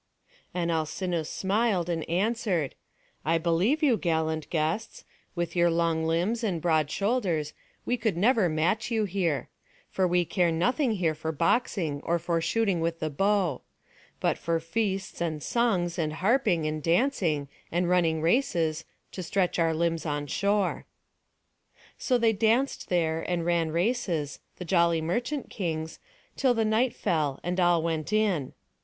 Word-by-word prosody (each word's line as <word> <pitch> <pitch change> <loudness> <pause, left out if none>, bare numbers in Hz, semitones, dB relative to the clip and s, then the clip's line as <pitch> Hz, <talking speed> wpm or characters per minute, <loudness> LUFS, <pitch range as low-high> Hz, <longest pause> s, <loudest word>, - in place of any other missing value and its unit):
And 170 -1 -1
Alcinous 160 +1 -2
smiled, 195 -2 0
and 165 -3 -3
answered: 185 - 0 0.5
"I 165 +2 +2
believe 175 - +1
you, 255 -7 +4
gallant 160 -3 -1
guests; 160 +7 -2 0.3
with 175 -1 -3
your 175 0 +4
long 165 -1 +1
limbs 185 +9 0
and 190 -7 0
broad 155 -3 +1
shoulders, 190 - 0 0.3
we 245 - 0
could 220 -7 -1
never 215 -1 +3
match 170 +9 0
you 225 -2 +1
here. 175 -7 -1 0.4
For 190 -1 +1
we 175 0 +2
care 175 0 +1
nothing 240 - +1
here 175 -6 0
for 155 +1 -4
boxing, 160 - 0
or 170 - +1
for 170 0 -1
shooting 200 -1 +1
with 165 0 -1
the 155 -1 -2
bow; 195 -2 +1 0.6
but - - 0
for 165 0 0
feasts, 195 +2 -2
and 155 -3 -2
songs, 185 -8 0
and 155 -2 -1
harping, 185 - +2
and 155 0 -2
dancing, 165 - +1 0.2
and 175 +1 +1
running 165 -3 +2
races, 165 - +1 0.3
to 185 - -6
stretch 180 0 0
our 165 -1 +3
limbs 165 0 0
on 145 -1 -2
shore." 200 +5 0 1.1
So 255 - +2
they 230 -2 +3
danced 230 +6 +1
there 165 -2 +1
and 175 -2 -1
ran 170 -2 +1
races, 170 - -1 0.2
the 180 - -6
jolly 170 -1 +3
merchant 240 - -2
kings, 160 -4 -4 0.4
till 260 -3 +2
the 225 -1 +1
night 230 +3 +1
fell, 150 - -1
and 180 +2 -2
all 175 -2 +3
went 165 +1 -2
in. 200 -11 +1
175 Hz, 150 wpm, -27 LUFS, 160-210 Hz, 1.1 s, you